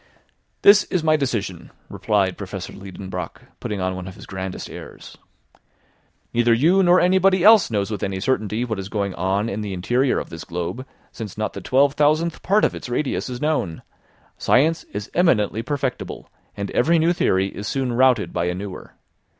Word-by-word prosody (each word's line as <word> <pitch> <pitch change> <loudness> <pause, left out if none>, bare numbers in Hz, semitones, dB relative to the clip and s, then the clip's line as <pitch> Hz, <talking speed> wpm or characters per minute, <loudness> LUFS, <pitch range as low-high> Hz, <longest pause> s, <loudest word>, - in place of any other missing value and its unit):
"This 205 +1 +7
is 180 -4 -1
my 155 -1 +4
decision," 110 - -3 0.2
replied 100 -3 0
Professor 95 -1 -7
Liedenbrock, 95 -2 -7 0.2
putting 105 - -4
on 95 0 -1
one 95 0 -7
of 95 - -9
his 100 - -12
grandest 95 -1 -6
airs. - - -11 1.2
"Neither 120 0 +3
you 170 +10 +4
nor 180 0 +5
anybody 185 0 +3
else 215 0 +7
knows 105 -2 -1
with 105 - -4
any 95 -1 -2
certainty 110 0 -1
what 110 -4 -3
is 95 +1 -6
going 100 -3 -2
on 95 +5 -1
in 110 -1 -3
the 100 -2 -4
interior 120 +9 +1
of - - -5
this 80 -1 -7
globe, 90 +10 -5 0.2
since 105 -4 -8
not 110 - -2
the 100 - -7
twelve 135 +7 +3
thousandth 155 +3 +1
part 205 +3 +3
of - - 0
its - - -7
radius 130 +2 -2
is 125 -1 -5
known; 150 - -1 0.6
science 160 +6 +2
is 105 +1 -7
eminently 115 - +2
perfectible; 135 0 -4 0.3
and 100 0 -4
every 165 +7 +3
new 165 +2 +3
theory 95 - +1
is 105 +2 -7
soon 130 -3 -1
routed 130 +1 +3
by 85 - 0
a 90 0 -1
newer. 95 0 -8
110 Hz, 180 wpm, -22 LUFS, 95-150 Hz, 1.2 s, This